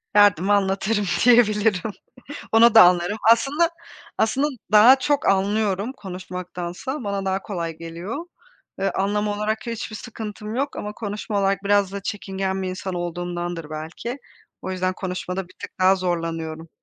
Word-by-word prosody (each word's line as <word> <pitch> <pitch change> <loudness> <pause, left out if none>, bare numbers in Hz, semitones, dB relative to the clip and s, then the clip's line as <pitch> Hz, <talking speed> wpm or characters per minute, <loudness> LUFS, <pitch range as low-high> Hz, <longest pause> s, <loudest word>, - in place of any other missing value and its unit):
Derdimi 205 -2 +5
anlatırım 200 +1 +1 0.2
diyebilirim. 215 -4 +4 0.6
Onu 225 +1 +6
da 220 - +11
anlarım. 180 +3 +3
Aslında 280 +9 +3 0.5
aslında 270 +7 +2 0.2
daha 235 +6 +8
çok 290 +2 +1
anlıyorum 200 +3 +1
konuşmaktansa, 180 - -6
bana 200 -1 -2
daha 190 0 0
kolay 170 -5 -4
geliyor. 170 - -6 0.5
Iıı, 195 - 0
anlama 205 +2 0
olarak 215 +2 -2
hiçbir 225 -1 -4
sıkıntım 215 -1 -7
yok 280 +2 -2
ama 210 0 -5
konuşma 210 -1 -3
olarak 195 0 +1
biraz 200 -1 +2
da 200 - -5
çekingen 195 -1 -3
bir 185 - -2
insan 185 0 -5
olduğumdandır 175 -1 -4
belki. 160 - -6 0.4
O 190 - -4
yüzden 185 0 -1
konuşmada 185 0 -4
bir - - -19
tık - - -7
daha 185 +1 +5
zorlanıyorum. 165 -3 -3
195 Hz, 140 wpm, -23 LUFS, 180-215 Hz, 0.6 s, da